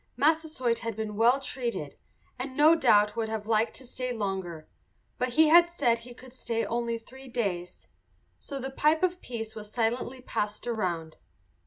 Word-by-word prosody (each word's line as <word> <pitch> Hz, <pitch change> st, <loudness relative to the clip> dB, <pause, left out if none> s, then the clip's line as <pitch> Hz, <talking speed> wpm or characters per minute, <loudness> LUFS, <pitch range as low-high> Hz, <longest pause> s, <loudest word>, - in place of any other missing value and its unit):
Massasoit 295 Hz, -5 st, +1 dB
had 230 Hz, -2 st, -4 dB
been 215 Hz, -1 st, -4 dB
well 235 Hz, +5 st, +4 dB
treated, 235 Hz, -, -4 dB, 0.4 s
and 260 Hz, 0 st, -5 dB
no 305 Hz, +2 st, +7 dB
doubt 210 Hz, -9 st, +4 dB
would 225 Hz, -1 st, -1 dB
have 220 Hz, -1 st, -3 dB
liked 220 Hz, +1 st, +1 dB
to 260 Hz, -, -11 dB
stay 250 Hz, +1 st, -4 dB
longer, 190 Hz, -7 st, -4 dB, 0.5 s
but 250 Hz, 0 st, -1 dB
he 315 Hz, +2 st, +6 dB
had 345 Hz, +1 st, +7 dB
said 250 Hz, -9 st, +1 dB
he 240 Hz, +1 st, -12 dB
could 255 Hz, 0 st, -14 dB
stay 230 Hz, -3 st, -2 dB
only 235 Hz, 0 st, -1 dB
three 260 Hz, +4 st, -13 dB
days. 185 Hz, -8 st, -3 dB, 0.5 s
So 280 Hz, -, -6 dB
the 265 Hz, 0 st, -4 dB
pipe 305 Hz, +5 st, +2 dB
of 360 Hz, 0 st, +1 dB
peace 225 Hz, -3 st, -5 dB
was 210 Hz, -1 st, -8 dB
silently 240 Hz, +3 st, -1 dB
passed 210 Hz, -4 st, -3 dB
around. 175 Hz, -9 st, -2 dB
235 Hz, 170 wpm, -28 LUFS, 215-265 Hz, 0.5 s, no